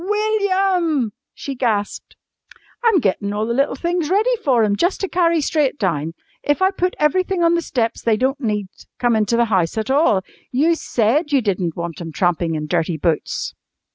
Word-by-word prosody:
"WILLIAM!" 380 - +1 0.2
she 275 - -6
gasped. 220 -5 -2 0.7
"I'm 455 -5 +4
gettin' 200 -1 -1
all 210 +1 -1
the 235 - -1
little 275 +2 +1
things 340 +1 -1
ready 435 +7 +2
for 250 -6 +3
'em 205 -1 +2
jus' 350 - +1
to 390 - -2
carry 335 -3 +2
straight 290 -1 0
down. 165 - -1 0.3
If 290 - 0
I 380 0 +3
put 365 -1 -1
everything 365 +4 +1
on 335 0 +4
the 340 - +1
steps 235 -7 -2
they 225 -2 +2
don't 270 +4 0
need 210 -4 -1 0.3
come 240 -2 +2
into 220 +2 +1
the 235 - +3
house 180 +1 +1
at 220 +3 -1
all. 270 - +3 0.3
You 300 +7 +3
said 295 +1 0
you 280 - +4
didn't 180 -5 -1
want 170 0 -5
'em 165 -1 -6
trampin' 170 -1 0
in 155 0 -3
dirty 160 +2 -1
boots!" 160 0 -1
260 Hz, 185 wpm, -20 LUFS, 205-340 Hz, 0.7 s, I'm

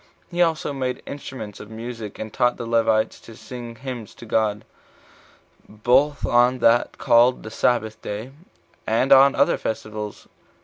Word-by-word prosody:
He 175 0 0
also 160 -3 +1
made 130 -2 -3
instruments 130 -7 -8
of 105 - -10
music, 115 -1 -7
and 110 -1 -7
taught 125 -2 +2
the 120 - -5
Levites 115 -1 +1
to 115 - -13
sing 120 0 -9
hymns 125 -3 -7
to - - -12
God, 110 -2 0 1.0
both 125 +7 +2
on 120 +1 +3
that 120 0 +3
called 120 +2 +4
the 110 - -8
sabbath 110 -2 0
day, 110 +5 -6 0.6
and 115 +4 +1
on 135 +1 +7
other - - +2
festivals. 105 -1 -5
115 Hz, 145 wpm, -23 LUFS, 110-130 Hz, 1.0 s, on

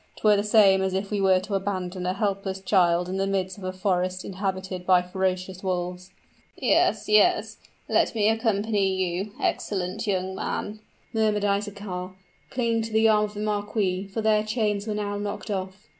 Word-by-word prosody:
'Twere 210 -1 +4
the 200 - +1
same 205 -3 +5
as 190 0 0
if 195 +2 -3
we 205 -1 0
were 190 -1 +4
to 200 +3 -6
abandon 185 -2 -2
a 185 - +1
helpless 195 -2 -2
child 180 -3 +2
in 185 +1 -3
the 195 0 0
midst 190 0 -2
of - - -11
a 185 - -2
forest 185 -1 -1
inhabited 190 -1 -4
by 180 0 +5
ferocious 185 0 -2
wolves." 180 -1 -3 0.5
"Yes 210 -1 +2
yes 215 - +3 0.3
let - - +2
me 210 -2 +2
accompany 215 -3 +1
you, 190 +2 -2
excellent 185 +1 -2
young 190 -1 -1
man!" 210 +2 -4 0.3
murmured 215 -2 +1
Isaachar, 200 -2 -3 0.3
clinging 230 -3 0
to 225 0 -5
the 220 0 +5
arm 210 -1 +4
of 210 0 -9
the 205 - -4
marquis, 205 -2 -1
for 200 +3 -4
their 215 -1 +3
chains 215 -2 -1
were 215 - -1
now 205 -1 -2
knocked 205 +1 -4
off. 190 0 -5
195 Hz, 175 wpm, -25 LUFS, 185-210 Hz, 0.5 s, same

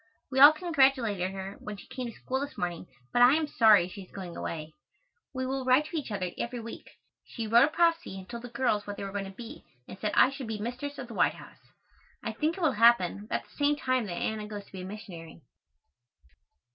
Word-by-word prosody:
We 265 - 0
all 285 +2 +11
congratulated 265 - +2
her 190 0 -7
when 210 -1 -7
she - - -12
came 255 -2 -6
to 230 - -7
school 260 +1 -3
this 285 +1 -6
morning, 175 0 -3 0.3
but 245 - +3
I 250 +3 +8
am 315 0 +1
sorry 215 -10 +5
she 195 +2 -9
is 185 - -14
going 185 -3 -7
away. 155 -1 -5 0.6
We 260 -1 -3
will 265 +1 -2
write 255 +4 +4
to 325 - -8
each 295 -6 -3
other 190 -4 -3
every 240 +1 -3
week. 230 0 -9 0.3
She 230 - -6
wrote 235 +4 +6
a - - -1
prophecy 330 - +1
and 190 -1 -10
told 235 -1 -7
the 245 - -8
girls 235 -4 0
what 205 0 -5
they - - -5
were 195 - -5
going 200 0 -3
to - - -7
be 235 +9 -10 0.2
and 190 - -10
said 210 - -2
I 260 - +6
should 270 -3 -7
be 220 -1 -3
mistress 250 +6 -5
of 255 - -6
the 235 - -9
White - - +2
House. - - -14 0.6
I - - -2
think 320 +3 -1
it - - -6
will 320 -4 +3
happen, 210 -4 +4
about - - -2
the - - -23
same 290 0 +2
time 255 -5 0
that 180 - -4
Anna 215 +4 -3
goes 205 -1 -7
to - - -22
be 190 - -7
a - - -6
missionary. 175 -6 -10
230 Hz, 240 wpm, -29 LUFS, 195-265 Hz, 0.6 s, all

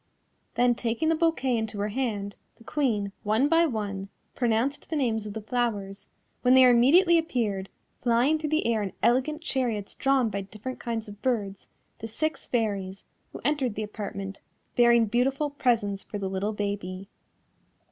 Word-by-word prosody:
Then 245 +1 +4
taking 235 +6 -1
the 325 - +3
bouquet 315 -6 +1
into 220 -2 -3
her 205 +1 -1
hand, 205 -4 -2 0.2
the 230 - -19
Queen, 225 -8 0
one 220 +6 +2
by 330 +2 +4
one, 200 -6 -4 0.2
pronounced 240 +4 0
the 320 - -2
names 225 -7 0
of 205 - -6
the 220 - -5
flowers, 210 -4 -2 0.3
when 250 +1 +5
there 255 -1 +8
immediately 335 +9 +5
appeared, 215 - -2 0.3
flying 245 +6 +3
through 305 -1 -3
the 310 +1 +1
air 230 -2 +1
in 195 -2 -4
elegant 260 +7 +2
chariots 235 -9 -2
drawn 270 -4 +2
by 200 0 -2
different 215 +6 -7
kinds 230 -2 -3
of 205 0 -11
birds, 205 -7 -2 0.3
the 225 - -5
six 310 +8 -3
Fairies 200 -5 -2 0.3
who - - -9
entered 270 -7 +1
the 215 - -2
apartment, 200 -2 -6 0.3
bearing 235 -1 +5
beautiful 265 +6 0
presents 225 -8 0
for 210 - -6
the 195 -1 -3
little 195 +3 -1
baby. 200 -2 -4
230 Hz, 165 wpm, -27 LUFS, 205-260 Hz, 0.3 s, there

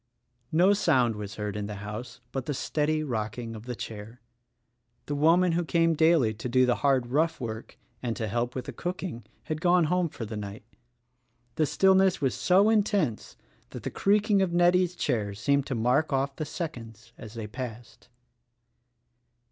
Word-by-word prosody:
No 180 +5 +5
sound 130 - +2
was 105 0 -7
heard 105 -1 -4
in 105 -1 -3
the 105 - -6
house 110 +4 -7
but 135 -2 -4
the 145 - -1
steady 155 +3 0
rock 110 -6 -3
ing 115 -2 -5
of 110 +2 -10
the 125 - -4
chair. 110 +2 -8 0.9
The 145 - -3
woman 165 +5 +4
who 175 +1 +1
came 165 +2 +2
daily 160 -8 +3
to 120 +3 -6
do 130 +1 +4
the 125 -1 +1
hard, 130 -4 +1
rough 160 +4 +1
work 115 -2 -6
— 120 -1 -40
and 120 -2 -2
to 110 -3 -3
help 120 +3 -2
with 130 - -4
the - - -7
cooking 175 - -5
— - - -38
had 155 0 -4
gone 175 0 +4
home 175 +1 +1
for 115 - -7
the 110 +1 -6
night. 105 +1 -7 0.9
The 155 +4 +1
stillness 190 +1 +4
was 135 -3 0
so 195 +4 +4
intense 200 - 0 0.3
that - - -9
the - - -3
creaking 205 0 +2
of 190 -2 +1
Nettie's 175 +1 +3
chair 105 - -1
seemed 140 +6 +1
to 130 - -2
mark 125 +7 +1
off 135 0 0
the 155 - -4
seconds 120 - -7
as 110 0 -10
they 115 -2 -5
passed. 120 +1 -8
135 Hz, 185 wpm, -27 LUFS, 115-170 Hz, 0.9 s, No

